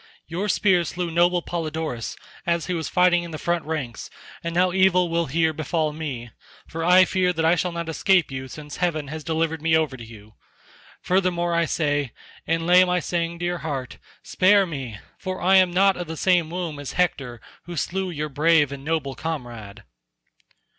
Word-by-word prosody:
Your 185 +6 -3
spear 190 -3 +3
slew 170 +1 -4
noble 175 +1 +2
Polydorus 160 -7 -4 0.3
as 170 -2 0
he 180 - -2
was 160 -4 -3
fighting 180 -1 +4
in 170 - -7
the 155 - -6
front 170 +1 -1
ranks, 150 -8 -4 0.3
and 170 0 -4
now 180 +1 +3
evil 180 -1 +3
will 170 0 0
here 160 +3 +1
befall 155 0 -1
me, 135 -7 -6 0.3
for 165 0 -5
I 180 +2 +6
fear 185 -1 +1
that 160 -1 -1
I 165 - +5
shall 180 0 0
not 170 -1 -4
escape 175 +1 +2
you 130 0 -5
since 150 +2 -9
heaven 155 -5 -1
has 155 +1 -6
delivered 160 0 -1
me 160 0 +3
over 155 -5 -1
to 120 - -10
you. 110 -2 -13 0.7
Furthermore 180 -2 +1
I 170 0 +2
say, 145 -5 -1 0.3
and 165 0 0
lay 180 +1 +7
my 180 0 +1
saying 170 -1 -2
to 175 - -4
your 175 0 -2
heart, 135 -5 -5 0.2
spare 200 +1 +4
me, 135 -10 -6 0.2
for 185 -1 -4
I 190 +2 +5
am 185 -1 +5
not 190 +2 +3
of 175 -2 -5
the 160 0 -6
same 175 -3 +2
womb 170 -4 -4
as 145 - -6
Hector 135 -9 -1 0.3
who 175 0 -7
slew 190 +4 -2
your 150 -3 -3
brave 150 0 +3
and 140 -1 -7
noble 150 -3 -1
comrade." 120 -10 -6
165 Hz, 190 wpm, -23 LUFS, 150-180 Hz, 0.7 s, lay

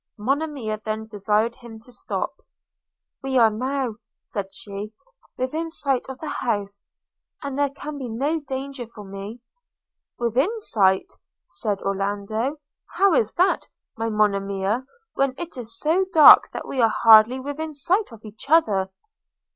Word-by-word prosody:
– - - -61
Monimia 260 -2 -2
then 220 0 -3
desired 215 +2 0
him 235 -3 -11
to 250 - -17
stop 245 - -4 0.4
– - - -64
'We 265 -1 -1
are 230 -2 +6
now,' 255 0 -2 0.2
said 195 -2 -6
she, 205 0 -7 0.4
'within 310 +6 -2
sight 275 -5 -2
of 265 - -6
the 315 - -7
house, 200 -3 -3 0.6
and 280 -1 -4
there 285 -1 +2
can 290 +1 -8
be 255 -3 -5
no 280 +8 -1
danger 270 -3 -6
for 220 -2 -12
me.' 200 +4 -8 0.4
– - - -65
'Within 240 - +1
sight!' 190 - +1 0.3
said 195 +4 -3
Orlando: 205 +7 -2 0.4
'How 395 -2 +4
is 220 -7 +2
that, 365 +2 +1 0.3
my 225 0 -2
Monimia, 200 +2 0 0.3
when 275 -1 0
it 345 -1 -6
is 230 -2 -8
so 340 +5 +2
dark 315 -4 +9
that - - -6
we 260 - -1
are 225 - +5
hardly 225 +3 +8
within 285 +4 -5
sight 350 - 0
of 225 -1 -13
each 215 +6 -11
other?' 210 -13 +3
235 Hz, 155 wpm, -23 LUFS, 210-280 Hz, 0.6 s, dark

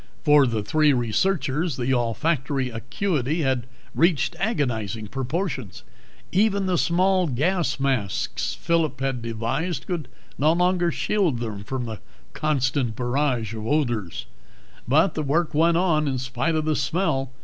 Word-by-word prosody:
For 145 -1 +6
the 110 -3 -1
three 150 +6 +3
researchers, 145 - 0
the 130 +1 0
olfactory 130 +2 0
acuity 145 - -1
had 130 -3 0 0.3
reached 170 -1 +2
agonizing 115 - -1
proportions. 135 - -3 0.5
Even 200 0 +2
the 185 -1 +1
small 185 +1 +2
gas 155 +3 0
masks 130 -8 -1
Phillip 160 -5 0
had 135 -2 -1
devised 115 +10 -2
could 170 -7 -3 0.3
no 155 +3 +4
longer 175 0 +2
shield 185 - 0
them 110 -4 -5
from 130 +3 -3
the 110 -2 -6 0.3
constant 135 -5 0
barrage 125 -3 0
of 110 - -5
violent 140 +3 +1
odors. 100 -8 -4 0.6
But 155 +9 +4
the 155 - -2
work 155 +3 0
went 165 +2 +3
on 160 -4 +2
in 135 -2 0
spite 130 +5 -1
of 155 -1 0
the 155 -1 +1
smell. 135 -8 0
140 Hz, 140 wpm, -24 LUFS, 120-170 Hz, 0.6 s, For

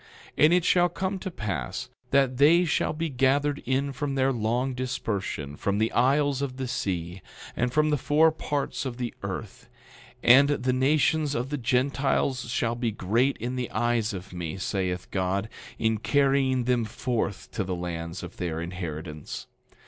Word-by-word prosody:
10:8 - - +5
And 160 - +5
it 180 -1 +3
shall 175 -1 +4
come 190 +2 -3
to 190 - -4
pass 105 - -4 0.2
that 135 -2 +3
they 165 +6 +6
shall 160 - +1
be 165 +2 -2
gathered 140 +1 +1
in 135 +2 0
from 140 +1 -3
their 135 0 +2
long 120 +3 0
dispersion, 105 - -3
from 100 +6 -1
the 110 +1 +1
isles 140 +2 +2
of 130 -2 -3
the 130 -1 -3
sea, 90 -5 -3 0.3
and 125 +1 0
from 155 +3 +2
the 150 - +1
four 155 +4 +4
parts 145 -2 -3
of 130 -3 -4
the 120 -2 -3
earth; 100 +1 -6 0.5
and 135 +4 +7
the 130 -3 +1
nations 145 +3 +2
of 125 +4 -2
the 145 - -1
Gentiles 130 0 +1
shall 120 -1 0
be 120 0 -1
great 115 +7 +1
in 120 +3 -3
the 125 -1 -3
eyes 120 -1 0
of 95 -1 -8
me, 85 -1 -4
saith 95 -2 -2
God, 95 +2 0 0.3
in 110 -1 +1
carrying 135 +2 +2
them 125 -1 +1
forth 110 -3 -3
to 105 - -2
the 95 -1 -3
lands 85 0 -5
of - - -9
their 80 -3 -2
inheritance. 80 -3 -6
125 Hz, 170 wpm, -27 LUFS, 100-140 Hz, 0.5 s, and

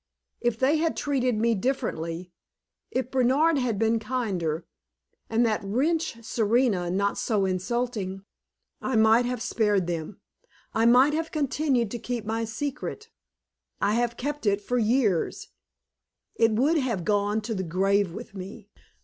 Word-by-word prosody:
If 240 -2 0
they 270 +6 +3
had 325 +1 0
treated 255 -4 0
me 230 +2 +2
differently 180 -8 -2 0.6
if 255 0 -2
Bernard 270 +5 +3
had 240 -5 0
been 225 +2 +2
kinder, 195 -9 -2 0.6
and 230 +2 +3
that 215 -2 +1
wretch 255 +3 -1
Serena 220 -5 +1
not 200 +3 0
so 210 -4 +1
insulting 195 0 -2 0.6
I 260 - -1
might 220 +2 +5
have 250 -1 -3
spared 210 -7 +1
them, 170 +2 -4 0.5
I 225 +1 +3
might 255 +5 +6
have 325 +1 -2
continued 275 -6 0
to 240 - -4
keep 240 -1 -4
my 225 +1 -1
secret. 290 - -5 0.7
I 205 - +2
have 235 +1 0
kept 290 -2 -3
it 200 0 +3
for 245 +4 -1
years; 220 -6 +1 0.8
it 225 -1 +3
would 290 +9 +3
have 230 - -2
gone 205 0 +1
to 225 +1 -4
the 190 - -2
grave 190 +2 +1
with 215 +4 -9
me. 195 +2 -9
230 Hz, 145 wpm, -26 LUFS, 200-255 Hz, 0.8 s, might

